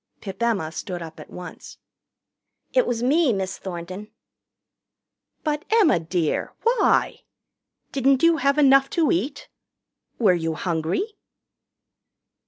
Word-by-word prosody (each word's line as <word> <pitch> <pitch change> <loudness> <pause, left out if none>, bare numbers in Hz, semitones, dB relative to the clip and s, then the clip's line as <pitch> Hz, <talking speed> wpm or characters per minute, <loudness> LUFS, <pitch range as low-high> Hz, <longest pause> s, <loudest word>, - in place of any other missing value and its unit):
Pip 195 0 -8
Emma 210 -9 0
stood 175 +1 -5
up 160 -1 -10
at - - -11
once. 180 0 -10 1.0
"It - - +3
was 235 -1 -1
me, 290 +2 +3
Miss 190 -2 -3
Thornton." 185 +3 -7 1.3
"But, 300 -1 -1
Emma, 425 - +4
dear, 165 -1 -2
why? 470 +1 +2 0.7
Didn't 270 +1 +2
you 335 -1 +5
have 280 0 +1
enough 275 -1 +5
to 320 -3 +3
eat? 255 - -2 0.7
Were 210 -6 +4
you 165 -2 -2
hungry?" 165 - -1
225 Hz, 115 wpm, -23 LUFS, 175-285 Hz, 1.3 s, you